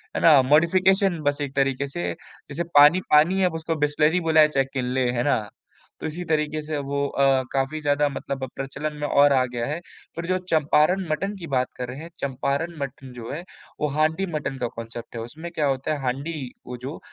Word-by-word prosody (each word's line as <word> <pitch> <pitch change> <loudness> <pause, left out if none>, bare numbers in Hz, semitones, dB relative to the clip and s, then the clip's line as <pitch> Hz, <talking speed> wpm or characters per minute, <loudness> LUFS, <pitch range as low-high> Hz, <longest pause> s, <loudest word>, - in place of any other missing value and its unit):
है - - -1
ना? 150 -5 +7
मॉडिफिकेशन 180 +6 +3
बस 145 +1 0
एक 140 -1 -4
तरीके 135 0 +1
से, 90 -9 -3 0.4
जैसे 160 +5 -2
पानी 150 +6 +8
पानी 165 +6 +5
है 185 - +4
उसको 165 0 -2
बिसलरी 150 +4 +2
बुलाएँ 160 -2 +5
है - - -1
चाहे 135 -2 +2
किनले, 125 -1 0
है 120 0 -1
ना? 140 -5 +2 0.6
तो - - -4
इसी 170 +3 -5
तरीके 155 -1 0
से 155 -1 -3
वो 140 0 -2
अ, 135 -1 +2
काफ़ी 135 +3 -1
ज़्यादा 145 0 +2
मतलब 135 -1 -4
प्रचलन 140 +3 -4
में 150 0 -2
और 140 0 +5
आ 130 -1 +4
गया 120 -1 -2
है, 150 +4 -3 0.4
फिर 170 0 -4
जो 185 +1 +1
चंपारण 160 +4 +3
मटन 195 +7 -1
की 170 - -7
बात 125 0 +2
कर 125 - -4
रहे 130 +2 -7
हैं, 165 +1 -8
चंपारण 140 +5 -2
मटन 135 -1 -6
जो 120 -2 -7
है, 170 +4 -5 0.4
वो 150 - +1
हांडी 160 +5 +2
मटन 140 -2 -3
का 125 -2 -1
कांसेप्ट 115 +1 -8
है। 115 - -4
उसमें 160 +9 -8
क्या 155 -3 -1
होता 135 +2 -1
है 145 - -3
हांडी 135 +1 -3 0.2
वो 125 0 -6
जो 145 - -6
145 Hz, 210 wpm, -24 LUFS, 135-160 Hz, 0.6 s, पानी